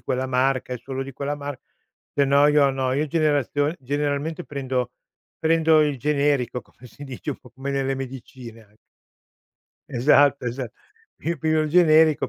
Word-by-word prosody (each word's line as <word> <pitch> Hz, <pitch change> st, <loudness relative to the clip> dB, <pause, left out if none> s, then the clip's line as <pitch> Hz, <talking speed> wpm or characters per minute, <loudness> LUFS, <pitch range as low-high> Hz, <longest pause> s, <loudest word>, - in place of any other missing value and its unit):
quella 130 Hz, +1 st, -2 dB
marca 130 Hz, 0 st, 0 dB
e 125 Hz, -, -4 dB
solo 135 Hz, -1 st, -4 dB
di 135 Hz, +1 st, -8 dB
quella 140 Hz, +3 st, -3 dB
mar 145 Hz, -2 st, -6 dB, 0.6 s
se 140 Hz, -, +3 dB
no 140 Hz, +1 st, +5 dB
io 145 Hz, -1 st, +4 dB
no, 130 Hz, -1 st, -1 dB
io 150 Hz, +3 st, 0 dB
generazio 145 Hz, -1 st, +1 dB
generalmente 145 Hz, +4 st, -2 dB
prendo 130 Hz, -4 st, -3 dB, 0.5 s
prendo 160 Hz, -1 st, +4 dB
il 145 Hz, -2 st, +1 dB
generico, 140 Hz, -2 st, 0 dB
come 125 Hz, -, -17 dB
si 145 Hz, +5 st, -12 dB
dice 135 Hz, +2 st, -6 dB
un -, -, -7 dB
po' 125 Hz, -, -18 dB
come 135 Hz, +2 st, -5 dB
nelle 135 Hz, -1 st, -1 dB
medicine 125 Hz, -3 st, -9 dB
an 105 Hz, 0 st, -27 dB, 1.1 s
Esatto, 140 Hz, +2 st, +4 dB
esa 120 Hz, 0 st, -4 dB, 0.5 s
Io 170 Hz, +1 st, -1 dB
piglio 155 Hz, +1 st, +1 dB
il 155 Hz, -, -2 dB
generico, 155 Hz, -2 st, +4 dB
140 Hz, 160 wpm, -23 LUFS, 130-150 Hz, 1.1 s, no